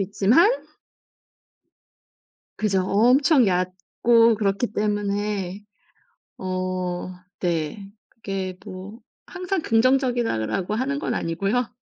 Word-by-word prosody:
있지만 205 - +4 2.1
그죠. 195 -3 +1
엄청 255 +6 +4
얕고 190 +6 +2
그렇기 200 +2 0
때문에 205 -2 -2 0.8
어 185 -1 -3 0.3
네. 175 +3 -2 0.2
그게 195 -4 -5
뭐 200 +3 -9 0.3
'항상 370 0 -3
긍정적이다.'라고 230 - +1
하는 275 +4 -1
건 - - -2
아니고요. 195 +9 -1
205 Hz, 185 characters per minute, -23 LUFS, 185-240 Hz, 2.1 s, 있지만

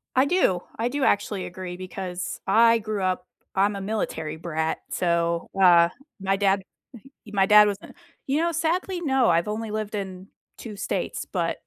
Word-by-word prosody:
I 260 - +5
do. 280 - +2 0.2
I 230 +2 0
do 280 +2 -2
actually 200 -4 +1
agree 180 0 -7
because 185 -1 -5
I 230 +3 +5
grew 215 -2 -3
up 185 -1 -1 0.3
I'm 200 +2 +2
a 195 - -5
military 175 -7 -3
brat, 160 -1 -2
so, 170 -1 0
uh, 170 -2 +7 0.3
my 195 0 +1
dad, 195 -1 +2 0.3
uh, - - -11 0.2
he 210 - -13
my 195 -1 +4
dad 210 +1 +7
was 200 - -1
a - - -11 0.3
you 280 +4 +1
know, 340 0 +1
sadly, 350 +3 -1
no. 265 -6 +2
I've 170 +1 +2
only 220 +1 -3
lived 215 0 -4
in 190 -2 -6 0.3
2 220 -3 -8
states, 200 +2 -3
but - - -1
200 Hz, 180 wpm, -25 LUFS, 180-225 Hz, 0.3 s, uh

